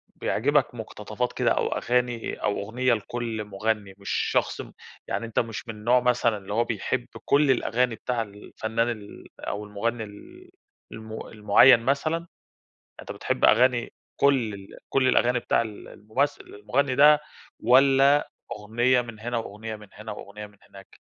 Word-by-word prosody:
بيعجِبك 130 0 +1
مُقتطفات 110 +1 -4
كده - - +1
أو - - +1
أغاني 120 -1 -1
أو 105 - 0
أُغنية 120 +4 0
لكلّ 115 0 -3
مُغنّي، 105 0 -2
مش 100 -2 -9 0.2
شخص - - 0
م - - -11 0.4
يعني 115 - -2
أنت 115 - -1
مش 115 0 -4
من 105 -2 -8
نوع 125 +3 +4
مثلًا 120 -2 +2
اللي 100 0 -7
هو 115 +2 +2
بيحب 115 -4 -2 0.2
كلّ 145 -1 +4
الأغاني 125 -1 +1
بتاع 120 +1 -2
الفنان 110 +2 -3
ال 105 -3 -8
أو 105 +1 -4
المُغنّي 110 +3 -2
ال 350 - -13 0.4
المُ 110 0 -8
المُعيّن 110 +4 +6
مثلًا، 155 +7 -1 0.7
أنت - - -8
بتحب - - 0
أغاني 120 +1 +3 0.2
كلّ 135 -6 +2
ال 100 -1 -10 0.2
كلّ 135 -1 +2
الأغاني 125 -1 +3
بتاع 115 - +1
ال 110 -3 -7
الممثِّل 130 +8 -2
المُغنّي 125 +6 -1
ده 150 +2 +7 0.4
والّا 135 +4 +5 0.2
أُغنية 120 +4 +1
من 115 -3 -10
هنا 120 +2 -3
وأُغنية 110 0 -6
من 105 -1 -13
هنا 105 +1 -8
وأُغنية 105 0 -9
من 105 0 -23
هناك؟ 95 -1 -15
115 Hz, 155 wpm, -25 LUFS, 105-125 Hz, 0.7 s, ده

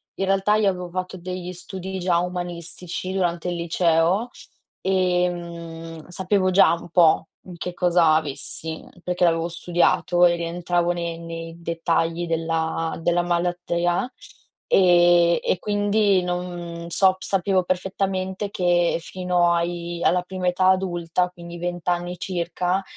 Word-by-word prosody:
in 195 - -1
realtà 195 +2 +2
io 215 -2 +3
avevo 180 -2 -4
fatto 185 +1 -4
degli 180 0 -6
studi 190 +1 -7
già 175 -1 +2
umanistici 175 +1 -5
durante 175 -2 -1
il 175 - -2
liceo, 170 +5 +1 0.5
ehm, 170 -3 -2
sapevo 185 +1 +1
già 185 -3 +5
un 170 0 -6
po' 165 -1 +4 0.3
che 180 +1 -5
cosa 175 -3 +4
avessi, 160 +1 -2 0.2
perché 180 0 -1
l'avevo 165 -1 +3
studiato 175 +1 +2
e 175 0 +4
rientravo 175 +1 -1
ne 170 -1 -4
nei 165 0 -7
dettagli 165 0 -1
della 165 0 -1
della 175 +1 +2
malattia, 175 +5 0 0.6
ehm, 175 -2 +5
e - - +1
quindi 205 -2 +2
non 175 -1 -4
sob 190 +2 +4
sapevo 190 -1 +1
perfettamente 190 +1 -2
che 175 -2 +2
fino 180 -1 +1
ai 170 0 -2
alla 180 0 +3
prima 185 0 -4
età 180 +1 +2
adulta, 180 -1 0
quindi 170 -1 -10
20 175 0 -5
anni 175 0 -1
circa, 180 +1 -1
175 Hz, 130 wpm, -23 LUFS, 170-185 Hz, 0.6 s, già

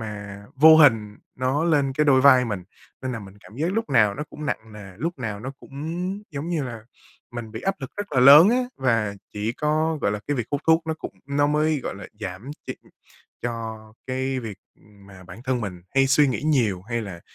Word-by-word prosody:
mà 100 -2 -7
vô 155 +3 +8
hình 115 -9 +4 0.2
nó 130 +5 0
lên 145 -5 +2
cái 150 +3 +1
đôi 135 -3 +5
vai 130 -2 +6
mình. 100 -6 -4 0.4
Nên 130 -1 -3
là 115 - -4
mình 100 -1 -11
cảm 110 - -15
giác 165 +6 -1
lúc 225 -6 -2
nào 105 -6 +4
nó 150 - -4
cũng 150 -1 -7
nặng 110 -4 -4
nề, 100 -3 -10
lúc 165 +5 -4
nào 105 -4 -4
nó 135 +4 -6
cũng, 175 +8 -5
giống 145 +3 -5
như 165 -4 -1
là, 115 -3 -7 0.5
mình 120 -2 -6
bị 110 - -6
áp 195 - 0
lực 135 - -6
rất 205 -6 -5
là 130 - +3
lớn 145 +8 +9
á, 240 - +3 0.2
và 115 -6 0 0.2
chỉ 105 +2 -2
có, 155 +3 0
gọi 100 - +1
là, 105 - -3
cái 145 - 0
việc 125 - -2
hút 145 0 -1
thuốc 160 0 +4
nó 160 - -1
cũng 160 - -8
nó 145 +1 +1
mới, 150 0 +1
gọi - - -5
là, 100 - -9
giảm 100 +6 -6 0.2
ch - - -5 0.7
cho 110 -2 -5
cái 130 0 -2
việc, 110 -4 -7 0.2
ừm, 100 -1 -21
mà 95 -2 -14
bản 90 +5 -11
thân 130 -2 0
mình 90 -5 -6
hay 135 0 +4
suy 140 +1 +4
nghĩ 130 - -2
nhiều 120 -12 +1
hay 115 +3 -3
là 95 -5 -8
130 Hz, 230 wpm, -24 LUFS, 105-150 Hz, 0.7 s, lớn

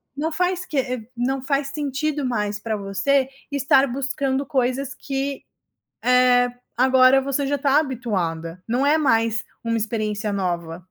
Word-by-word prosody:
não 315 +3 -2
faz 360 +2 0
que 255 -5 -2
não 260 +2 -1
faz 275 +1 0
sentido 290 0 -2
mais 210 -4 -2
pra 220 -1 -2
você 200 +8 +1 0.2
estar 275 -1 +4
buscando 275 +1 -1
coisas 265 0 -1
que, 275 0 -4 0.6
eh, 250 0 +4 0.3
agora 260 +1 +5
você 275 +1 -1
já 280 0 -1
tá 280 0 +3
habituada, 185 - -3
não 245 +4 +1
é 295 +2 +4
mais 230 -6 +1 0.2
uma 230 0 0
experiência 215 -1 -2
nova. 175 -3 -2
255 Hz, 140 wpm, -22 LUFS, 225-275 Hz, 0.6 s, agora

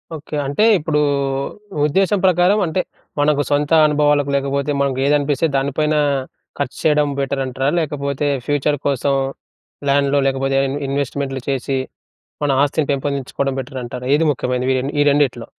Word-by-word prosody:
Okay. 155 0 -7
అంటే 145 +9 +1 0.2
ఇప్పుడు 150 -1 0 0.9
ఉద్దేశ్యం 195 +6 +2
ప్రకారం 185 +3 +4
అంటే 170 +2 0 0.4
మనకు 145 0 +3
సొంత 145 +1 +1
అనుభవాలకు 145 -1 +2
లేకపోతే, 140 +1 -1
మనకు 135 -2 0
ఏది 145 +1 +4
అనిపిస్తే 145 +2 0
దానిపైన 145 +3 0 0.6
ఖర్చు 140 -2 -3
చేయడం 150 -1 +3
బెటర్ 135 0 -1
అంటారా? 130 +1 -1
లేకపోతే 145 -2 -2 0.2
ఫ్యూచర్ 145 0 +1
కోసం 140 0 +1 0.8
ల్యాండ్‌లో 140 0 +3
లేకపోతే 135 0 0
ఇన్ 140 - -3
ఇన్వెస్ట్‌మెంట్లు 135 -1 -2
చేసి 135 0 -1 0.7
మన 145 - +1
ఆస్తిని 145 +1 0
పెంపొందించుకోవడం 140 -1 -2
బెటర్ 130 +1 -7
అంటారా? 125 +1 -7
ఏది 160 +2 +1
ముఖ్యమైనది 125 -1 -2
ఇవ్వని 130 +2 -2
ఈ - - +4
రెండిట్లో? 140 -5 +1
140 Hz, 140 wpm, -19 LUFS, 135-150 Hz, 0.9 s, ప్రకారం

